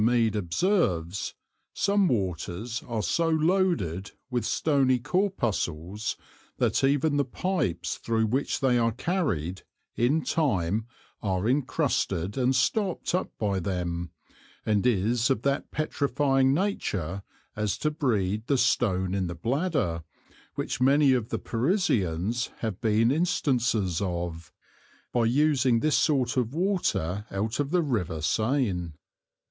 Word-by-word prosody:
Mead_ 115 -2 +3
observes, 95 - 0 0.4
some 200 -1 +2
waters 100 - -2
are 115 -3 -2
so 165 -1 +1
loaded 160 - +1 0.2
with 120 -1 -1
stony 135 -4 +2
Corpuscles, 110 - -1 0.4
that - - +1
even 145 +2 +2
the 145 - +3
Pipes 140 - -2
thro' 110 -1 0
which 130 +8 -1
they 125 -2 +3
are 115 -1 +2
carried, 110 - -1 0.3
in 140 +7 +2
time 110 - 0 0.3
are 95 0 -1
incrusted 115 - 0
and 130 0 +2
stopt 190 - 0
up 180 - 0
by 100 -3 0
them, 85 -2 -3 0.6
and 105 +1 +2
is 115 +3 +2
of 130 -4 0
that 140 0 0
petrifying 140 -3 +1
nature 100 - -1 0.3
as 105 -2 -1
to 150 - 0
breed 110 -8 -1
the 140 - +2
Stone 95 -7 +1
in 95 -2 0
the 85 - -5
Bladder, 125 - -1 0.5
which - - -3
many 140 +1 +5
of 120 -2 -1
the - - -1
Parisians 115 - 0
have 110 -5 -3
been 115 +1 +3
instances 125 - +1
of, 85 -3 -4 0.6
by 120 -2 +2
using 130 -1 +3
this 155 -1 +2
sort 135 -5 +2
of 125 +2 0
water 135 - 0
out 110 +6 -2
of 145 -1 0
the 175 +1 +2
River 105 - -1
Seine. 100 - 0
120 Hz, 125 wpm, -27 LUFS, 95-145 Hz, 0.6 s, many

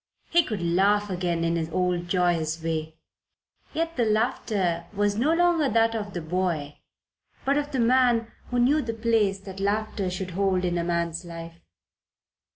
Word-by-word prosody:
He 345 - +6
could 215 - -4
laugh 200 +4 +2
again 175 -2 -1
in 170 0 +1
his 160 -1 -2
old 180 0 0
joyous 170 -3 0
way; 160 -1 -3 0.8
yet 330 0 -2
the 240 - +3
laughter 215 -6 0
was 205 0 +1
no 260 +9 +2
longer 335 -3 +3
that 225 +1 +3
of 210 -3 -4
the 175 - -2
boy, 160 -4 -2 0.7
but 275 +1 +3
of 290 0 -1
the 265 - -1
man 240 -1 +3 0.2
who 245 - -1
knew 270 +6 +4
the 230 -3 -4
place 220 -3 +2
that 195 -1 -9
laughter 205 -1 -1
should 185 0 -4
hold 185 0 +1
in 175 -1 0
a - - -1
man's 170 0 -1
life. 165 -1 -9
195 Hz, 165 wpm, -26 LUFS, 170-230 Hz, 0.8 s, He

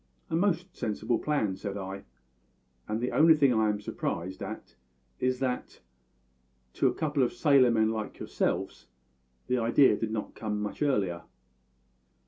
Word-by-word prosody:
"A - - +1
most 180 0 0
sensible 110 +2 -1
plan," 125 -11 0
said 100 +1 -5
I, 95 0 -6 0.8
"and 110 +1 -2
the 125 +2 -1
only 160 +1 +6
thing 140 -4 +4
I 110 -1 +2
am 105 -1 -1
surprised 95 -2 -4
at - - -7 0.5
is 130 0 +1
that, 125 -1 -3 0.9
to - - +2
a - - +1
couple 150 -3 0
of 125 - +2
sailor 140 -5 +5
men 110 -1 +2
like 110 -1 -4
yourselves, - - -2 0.6
the 125 - 0
idea 120 +4 +4
did 115 - -3
not 110 -1 -4
come 105 -2 -3
much 105 +6 -5
earlier." 100 -12 +1
115 Hz, 150 wpm, -29 LUFS, 105-140 Hz, 0.9 s, only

